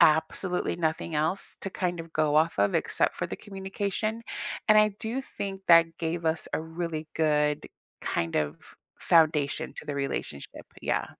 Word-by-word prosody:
absolutely 160 Hz, +4 st, +3 dB
nothing 160 Hz, 0 st, -1 dB
else 160 Hz, +6 st, -1 dB
to 195 Hz, -, -3 dB
kind 175 Hz, -2 st, -1 dB
of 165 Hz, -1 st, -10 dB
go 155 Hz, -1 st, +2 dB
off 160 Hz, -4 st, +3 dB
of 100 Hz, 0 st, +3 dB
except -, -, +1 dB
for -, -, -1 dB
the -, -, -5 dB
communication, 200 Hz, +3 st, -3 dB, 0.5 s
and 215 Hz, 0 st, +8 dB
I 215 Hz, 0 st, +6 dB
do 230 Hz, +4 st, -2 dB
think 195 Hz, -7 st, -6 dB
that 165 Hz, -1 st, +6 dB
gave 165 Hz, 0 st, -2 dB
us 160 Hz, 0 st, 0 dB
a -, -, 0 dB
really 160 Hz, -1 st, -4 dB
good 150 Hz, -2 st, +2 dB, 0.3 s
kind 85 Hz, -1 st, -1 dB
of 75 Hz, -1 st, 0 dB, 0.4 s
foundation 155 Hz, -4 st, +3 dB
to -, -, -7 dB
the 145 Hz, -, -3 dB
relationship, 135 Hz, -, -4 dB, 0.2 s
yeah. -, -, 0 dB
165 Hz, 160 wpm, -28 LUFS, 155-190 Hz, 0.5 s, and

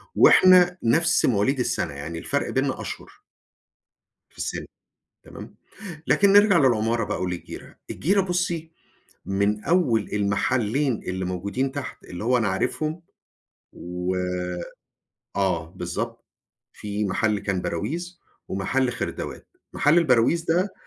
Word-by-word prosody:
وإحنا 180 Hz, -1 st, +6 dB
نفس 160 Hz, +9 st, +3 dB
مواليد 125 Hz, +4 st, +1 dB
السنة 120 Hz, -, -1 dB
يعني 80 Hz, +4 st, -6 dB
الفرق 140 Hz, +10 st, -2 dB
بيننا 135 Hz, 0 st, -1 dB
أشهر. -, -, -8 dB, 1.1 s
في -, -, -28 dB
السِن. -, -, -4 dB, 0.6 s
تمام؟ -, -, -11 dB, 0.5 s
لكن 200 Hz, 0 st, +4 dB
نرجع 205 Hz, -2 st, +6 dB
للعمارة 115 Hz, -4 st, +2 dB
بقى -, -, -3 dB
وللجيرَة. 90 Hz, -1 st, -6 dB
الجيرَة 195 Hz, +5 st, +1 dB
بُصي، 175 Hz, -3 st, -2 dB, 0.5 s
من 100 Hz, +2 st, 0 dB
أول 140 Hz, -, +2 dB
المحلين 110 Hz, +5 st, 0 dB
اللي 95 Hz, 0 st, -3 dB
موجودين 100 Hz, +9 st, -2 dB
تحت 140 Hz, -1 st, -7 dB
اللي 90 Hz, +3 st, -7 dB
هو 125 Hz, +2 st, +3 dB
أنا 115 Hz, -4 st, +1 dB
عارفهم، 155 Hz, -, -2 dB, 0.7 s
و 90 Hz, +1 st, -4 dB, 1.2 s
آه 90 Hz, -5 st, 0 dB
بالضبط، 90 Hz, -1 st, -5 dB, 0.5 s
في 105 Hz, 0 st, -3 dB
محل 105 Hz, +2 st, 0 dB
كان 95 Hz, -2 st, -2 dB
براويز 170 Hz, -, -4 dB, 0.3 s
ومحل 125 Hz, +7 st, 0 dB
خردوات، 115 Hz, -, -5 dB, 0.3 s
محل 150 Hz, +4 st, +3 dB
البراويز 160 Hz, +1 st, +3 dB
ده 180 Hz, +4 st, 0 dB
120 Hz, 115 wpm, -24 LUFS, 100-165 Hz, 1.2 s, وإحنا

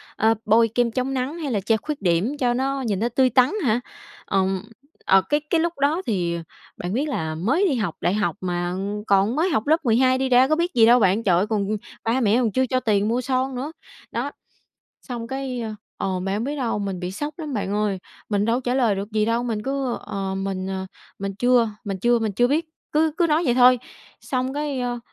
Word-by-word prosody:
ờ, 220 Hz, +1 st, +3 dB
bôi 225 Hz, +2 st, +5 dB
kem 240 Hz, -1 st, +2 dB
chống 255 Hz, +3 st, -1 dB
nắng 265 Hz, +5 st, -2 dB
hay 290 Hz, -5 st, -3 dB
là 205 Hz, -, +1 dB
che 220 Hz, +3 st, +1 dB
khuyết 295 Hz, +1 st, -5 dB
điểm 190 Hz, -, +1 dB
cho 245 Hz, -2 st, +2 dB
nó 270 Hz, +2 st, -1 dB
nhìn 210 Hz, -6 st, -1 dB
nó 235 Hz, +3 st, 0 dB
tươi 255 Hz, +2 st, +3 dB
tắn 255 Hz, +3 st, +4 dB
hả?" 225 Hz, 0 st, +2 dB, 0.5 s
Ừm, 190 Hz, -1 st, 0 dB, 0.4 s
ờ, 195 Hz, 0 st, +6 dB
cái 295 Hz, 0 st, +3 dB
cái 335 Hz, -, +3 dB
lúc 340 Hz, 0 st, 0 dB
đó 300 Hz, +6 st, +2 dB
thì 175 Hz, -6 st, -1 dB, 0.4 s
bạn 175 Hz, +2 st, -4 dB
biết 275 Hz, +7 st, 0 dB
là 160 Hz, -, -2 dB
mới 260 Hz, -, +1 dB
đi 280 Hz, -, +1 dB
học 205 Hz, -9 st, -2 dB
đại 180 Hz, -, +1 dB
học 210 Hz, 0 st, 0 dB
mà 175 Hz, -1 st, -2 dB, 0.3 s
còn 200 Hz, +4 st, +3 dB
mới 330 Hz, +5 st, +2 dB
học 275 Hz, -7 st, 0 dB
lớp 315 Hz, 0 st, +2 dB
12 255 Hz, +3 st, +4 dB
đi 265 Hz, 0 st, -1 dB
ra 255 Hz, +1 st, +6 dB
có 310 Hz, -, +2 dB
biết 345 Hz, +2 st, -1 dB
gì 230 Hz, -2 st, +6 dB
đâu 240 Hz, +2 st, +6 dB
bạn, 205 Hz, +2 st, +2 dB
trời 180 Hz, -4 st, +3 dB
ơi, 195 Hz, -, +1 dB
còn 210 Hz, -2 st, 0 dB, 0.4 s
ba 240 Hz, +3 st, +1 dB
mẹ 220 Hz, 0 st, +3 dB
còn 230 Hz, -4 st, +1 dB
chưa 260 Hz, +3 st, +2 dB
cho 255 Hz, -, +1 dB
tiền 210 Hz, -4 st, +1 dB
mua 240 Hz, +3 st, +1 dB
son 260 Hz, +1 st, -1 dB
nữa, 270 Hz, +5 st, -4 dB, 0.4 s
đó. -, -, -2 dB, 0.7 s
Xong, 240 Hz, -3 st, -6 dB
cái 265 Hz, -2 st, -4 dB, 0.3 s
ờ, 185 Hz, -1 st, -2 dB
bạn 195 Hz, +1 st, -2 dB
hông 215 Hz, -, -1 dB
biết 290 Hz, +3 st, -3 dB
đâu, 245 Hz, -6 st, -1 dB
mình 195 Hz, -3 st, -3 dB
bị 180 Hz, 0 st, -3 dB
sốc 295 Hz, +8 st, -4 dB
lắm 305 Hz, -4 st, -5 dB
bạn 200 Hz, -3 st, -2 dB
ơi, 205 Hz, -2 st, 0 dB, 0.3 s
mình 205 Hz, -1 st, +1 dB
đâu 230 Hz, +2 st, +2 dB
có -, -, -2 dB
trả 245 Hz, -1 st, -1 dB
lời 240 Hz, -6 st, +3 dB
được 200 Hz, +2 st, -5 dB
gì 215 Hz, -1 st, +2 dB
đâu, 230 Hz, +2 st, +1 dB
mình 225 Hz, -3 st, -2 dB
cứ: 270 Hz, -1 st, -2 dB
"Ờ, 195 Hz, -1 st, -4 dB
mình, 190 Hz, -1 st, -3 dB
ờ, 190 Hz, 0 st, -4 dB, 0.3 s
mình 195 Hz, 0 st, -4 dB
chưa 245 Hz, -3 st, +3 dB
mình 195 Hz, -2 st, -3 dB
chưa 240 Hz, +4 st, +3 dB
-mình 220 Hz, -2 st, -1 dB
chưa 245 Hz, +5 st, +3 dB
biết," 315 Hz, +5 st, +1 dB, 0.3 s
cứ 310 Hz, 0 st, +2 dB
cứ 345 Hz, -, +3 dB
nói 320 Hz, +2 st, +2 dB
vậy 245 Hz, -5 st, +2 dB
thôi, 250 Hz, 0 st, +6 dB, 0.4 s
xong, 255 Hz, 0 st, -2 dB
cái, 290 Hz, -3 st, -2 dB
ờ, 245 Hz, -1 st, -2 dB
235 Hz, 235 wpm, -23 LUFS, 200-265 Hz, 0.7 s, ờ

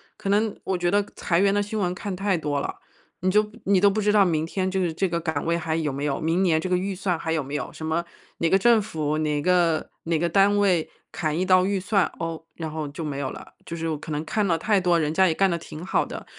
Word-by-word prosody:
可 195 Hz, -, -5 dB
能 210 Hz, +1 st, +2 dB
我 190 Hz, -, -1 dB
觉 175 Hz, 0 st, 0 dB
得 205 Hz, +1 st, +3 dB
裁 170 Hz, -2 st, +1 dB
员 200 Hz, +1 st, +4 dB
的 205 Hz, 0 st, +2 dB
新 215 Hz, +1 st, -4 dB
闻 180 Hz, -2 st, 0 dB
看 195 Hz, 0 st, -4 dB
太 195 Hz, 0 st, 0 dB
多 145 Hz, -3 st, -1 dB
了， -, -, -4 dB, 0.5 s
你 185 Hz, +1 st, +2 dB
就 210 Hz, +1 st, +2 dB
你 195 Hz, -1 st, +3 dB
都 200 Hz, -, +6 dB
不 200 Hz, +2 st, -1 dB
知 210 Hz, 0 st, +2 dB
道 210 Hz, -1 st, +6 dB
明 160 Hz, -4 st, +1 dB
天 185 Hz, +3 st, -2 dB
就 190 Hz, 0 st, -1 dB
是 170 Hz, -3 st, 0 dB
这 190 Hz, +3 st, 0 dB
个 170 Hz, 0 st, -1 dB
岗 160 Hz, -3 st, -2 dB
位 170 Hz, +1 st, +1 dB
还 160 Hz, -1 st, -2 dB
有 155 Hz, -3 st, -1 dB
没 140 Hz, +2 st, -3 dB
有、 140 Hz, -2 st, -1 dB
明 165 Hz, +4 st, +1 dB
年 160 Hz, -3 st, +2 dB
这 185 Hz, -, -3 dB
个 180 Hz, -, +2 dB
预 195 Hz, +2 st, -2 dB
算 185 Hz, -2 st, -1 dB
还 160 Hz, -, -3 dB
有 160 Hz, -2 st, +1 dB
没 140 Hz, +2 st, -6 dB
有， -, -, -4 dB
什 -, -, -9 dB
么 160 Hz, +2 st, -1 dB, 0.3 s
哪 165 Hz, -, +1 dB
个 190 Hz, -, +4 dB
政 230 Hz, +2 st, +5 dB
府、 155 Hz, -7 st, -2 dB
哪 150 Hz, -1 st, 0 dB
个 175 Hz, -2 st, +2 dB
哪 165 Hz, -1 st, 0 dB
个 170 Hz, +1 st, +1 dB
单 200 Hz, +3 st, +4 dB
位 185 Hz, -5 st, +2 dB, 0.2 s
砍 160 Hz, -2 st, -2 dB
一 185 Hz, -, +1 dB
刀 185 Hz, 0 st, +5 dB
预 200 Hz, -1 st, 0 dB
算， 195 Hz, 0 st, +1 dB
哦， 165 Hz, -1 st, -4 dB
然 160 Hz, -2 st, -5 dB
后 155 Hz, -1 st, -4 dB
就 145 Hz, +3 st, -6 dB
没 145 Hz, -2 st, -4 dB
有 135 Hz, -2 st, -2 dB
了。 -, -, -11 dB
就 170 Hz, -, -6 dB
是 165 Hz, 0 st, -3 dB
我 155 Hz, -, -2 dB
可 155 Hz, -, -9 dB
能 150 Hz, +1 st, -2 dB
看 210 Hz, +6 st, 0 dB
了 170 Hz, -4 st, +2 dB
太 205 Hz, +4 st, +2 dB
多 175 Hz, -2 st, +2 dB
人 150 Hz, -2 st, 0 dB
家 190 Hz, +2 st, +4 dB
也 165 Hz, -, +2 dB
干 195 Hz, +4 st, +2 dB
得 170 Hz, -, 0 dB
挺 160 Hz, -1 st, -9 dB
好 -, -, +1 dB
的， -, -, -8 dB
175 Hz, 310 characters per minute, -24 LUFS, 160-195 Hz, 0.5 s, 都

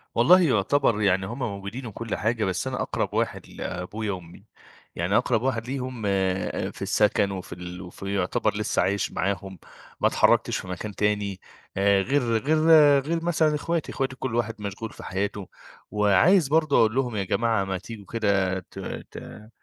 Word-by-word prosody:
والله 175 Hz, +11 st, +6 dB
يعتبر 120 Hz, -, +2 dB
يعني 95 Hz, -2 st, +2 dB
هم 115 Hz, +7 st, -6 dB
موجودين 105 Hz, +1 st, -5 dB
وكل 115 Hz, 0 st, -4 dB
حاجة، 110 Hz, 0 st, 0 dB
بس 95 Hz, +6 st, -2 dB
أنا 130 Hz, -1 st, -2 dB
أقرَب -, -, -2 dB
واحد -, -, -2 dB
لأبويا 100 Hz, +5 st, -4 dB
وأمي، 90 Hz, -3 st, -9 dB, 0.5 s
يعني 90 Hz, +5 st, +1 dB
أقرَب 120 Hz, -2 st, +1 dB
واحد 120 Hz, -3 st, -1 dB
ليهم 130 Hz, -3 st, -4 dB
آآ 95 Hz, -1 st, -1 dB
في -, -, -14 dB
السَكَن 105 Hz, -2 st, +2 dB
وفي 95 Hz, -2 st, -6 dB
ال 90 Hz, +1 st, -8 dB
وفي 95 Hz, +2 st, -6 dB
يعتبر 90 Hz, -2 st, 0 dB
لسّه -, -, 0 dB
عايش 100 Hz, +1 st, 0 dB
معاهم 95 Hz, -1 st, -3 dB, 0.4 s
ما -, -, +5 dB
اتحرّكتش -, -, +3 dB
في -, -, -7 dB
مكان 95 Hz, +3 st, -6 dB
تاني 105 Hz, -2 st, 0 dB, 0.4 s
آآ 100 Hz, 0 st, +4 dB
غير 140 Hz, +7 st, +1 dB, 0.2 s
غير 150 Hz, +7 st, +1 dB, 0.4 s
غير 165 Hz, +4 st, -2 dB
مثلًا 160 Hz, -3 st, +2 dB
إخواتي، 165 Hz, +1 st, -2 dB
إخواتي 135 Hz, -1 st, -2 dB
كل 130 Hz, -3 st, -4 dB
واحد 115 Hz, -2 st, -1 dB
مشغول 100 Hz, +2 st, -5 dB
في -, -, -11 dB
حياته. 100 Hz, 0 st, -3 dB, 0.4 s
وعايز 105 Hz, -, +4 dB
برضه 155 Hz, 0 st, +3 dB
أقول 110 Hz, 0 st, +3 dB
لهم 125 Hz, -4 st, 0 dB
يا 100 Hz, -, 0 dB
جماعة 110 Hz, +2 st, +1 dB
ما 95 Hz, -1 st, -2 dB
تيجوا 105 Hz, +1 st, -10 dB
كده 95 Hz, -3 st, 0 dB
ت -, -, -12 dB, 0.3 s
ت 105 Hz, +1 st, -10 dB
105 Hz, 170 wpm, -25 LUFS, 95-125 Hz, 0.5 s, والله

